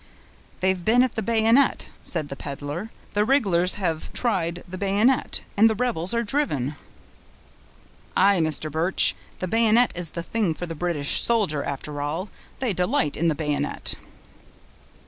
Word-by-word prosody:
"They've 185 -1 +1
been 240 +6 +4
at 255 - 0
the 220 - -2
bayonet," 230 +4 +3 0.2
said 155 -4 0
the 140 - -5
peddler; 145 +9 -6 0.2
"the 205 - +2
rig'lars 195 -8 +2
have 165 -6 -3
tried 175 -7 -1
the 180 - -7
bayonet, 205 +6 +1
and 220 +2 +6
the 220 - 0
rebels 210 -7 -1
are 235 - +1
driven." 150 - -1 1.4
"Aye, 195 0 +5
Mr. 155 -1 +1
Birch, 165 +5 +2 0.2
the 185 - -3
bayonet 230 +4 +4
is 175 -2 -3
the 170 - -2
thing 200 -5 -1
for 175 - -5
the 165 - -6
British 160 -3 0
soldier, 200 -11 +1
after 145 +1 -5
all. 160 +7 -3 0.3
They 250 -6 -1
delight 180 -5 0
in 170 - 0
the 160 - +2
bayonet!" 150 -1 -1
180 Hz, 150 wpm, -24 LUFS, 160-225 Hz, 1.4 s, and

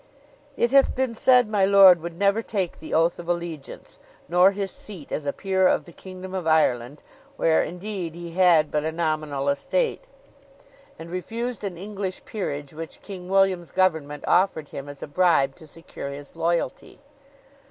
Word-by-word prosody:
It 235 - +1
hath 275 0 +4
been 260 -2 -1
said 250 +1 +4
my 210 -2 +1
lord 190 -3 +7
would 170 0 -7
never 200 +3 +2
take 195 -6 -3
the 160 - -10
oath 165 +2 +2
of 175 0 -8
allegiance, 170 -5 -5 0.3
nor 180 +3 +5
his 195 -1 -3
seat 185 -9 -9
as 145 - -3
a - - +2
peer 190 +1 +1
of - - +1
the 170 - -13
kingdom 185 +2 -10
of 185 -3 -3
Ireland, 140 -4 +1 0.3
where, 160 -1 +3
indeed, 180 -2 -5
he 170 -1 -8
had 170 -4 +4
but 150 0 0
a 160 - -1
nominal 155 -4 -2
estate; 455 - 0 0.9
and 165 +1 -10
refused 230 +5 -4
an 190 -4 -4
English 195 0 -5
peerage 145 -9 -5
which 160 +1 -9
King 185 -3 -9
William's 190 -3 +2
government 160 -6 0
offered 175 -5 +2
him 140 +1 -7
as 145 -1 -9
a - - -6
bribe 145 -4 +2
to 160 - -14
secure 155 -2 -9
his 140 +2 -9
loyalty. 165 -4 -2
175 Hz, 170 wpm, -24 LUFS, 155-195 Hz, 0.9 s, lord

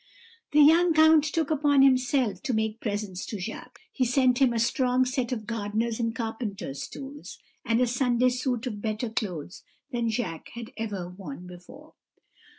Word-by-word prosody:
"The 300 0 +6
young 330 +2 +5
count 315 -1 +6
took 315 -1 -1
upon 285 -2 +4
himself 255 -3 +2
to 255 -6 -1
make 220 0 -1
presents 205 -3 -3
to 210 - -5
Jacques; 220 +5 -7
he 260 - 0
sent 250 0 +3
him 265 -3 +4
a 235 - -1
strong 250 +2 +2
set 255 -1 -2
of 220 -4 -3
gardener's 220 +1 -2
and 230 -1 -1
carpenter's 220 - -4
tools, 280 +2 -9 0.3
and 230 0 +1
a 250 - +4
Sunday 245 0 +2
suit 250 -1 -2
of 210 -5 -5
better 220 +1 -2
clothes 180 -6 -4 0.3
than 235 -2 -1
Jacques 220 -8 -3
had 235 -1 -7
ever 205 -6 -4
worn 180 -3 -9
before. 180 0 -13
235 Hz, 165 wpm, -27 LUFS, 215-260 Hz, 0.3 s, The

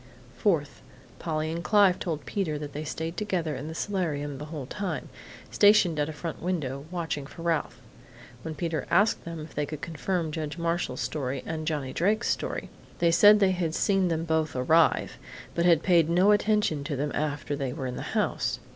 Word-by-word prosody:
"Fourth: 160 - 0 0.4
Polly 155 -1 -2
and 170 +1 -4
Clive 200 -3 +4
told 160 -4 -3
Peter 170 -7 -2
they 145 0 -5
stayed 160 +2 -4
together 175 -8 -1
in 140 +4 -6
the 160 - -6
solarium 150 -8 -2
the 150 - -6
whole 150 -3 -6
time, 195 +6 -4 0.4
stationed 205 -6 +5
at 145 +1 0
a - - -3
front 160 +1 -6
window, 145 -6 -2
watching 165 -5 -3
for 165 - -10
Ralph. 160 -7 -1 0.6
When 160 +2 -6
Peter 160 -1 -2
asked 205 +6 +3
them 165 -1 -6
if 155 - -10
they 150 0 -2
could 150 0 -6
confirm 170 0 -2
Judge 150 0 -4
Marshall's 170 -6 -1
story 130 +1 -3
and 155 -1 -4
Johnny 145 -5 -2
Drake's 205 +5 +1
story, - - -3 0.3
they 170 -1 +3
said 205 +5 +7
they 195 -2 +4
had 170 -3 -1
seen 195 -2 +2
them 165 -1 -1
both 160 -2 0
arrive, 160 +6 +3 0.3
but 170 - +1
had 170 -3 +5
paid 170 -4 +4
no 180 +4 +5
attention 210 -8 +2
to 150 -2 -2
them 145 +2 -2
after 145 -1 -2
they 135 -3 -3
were 130 - -5
in 125 -1 -3
the - - -6
house. - - 0
160 Hz, 190 wpm, -27 LUFS, 150-175 Hz, 0.6 s, said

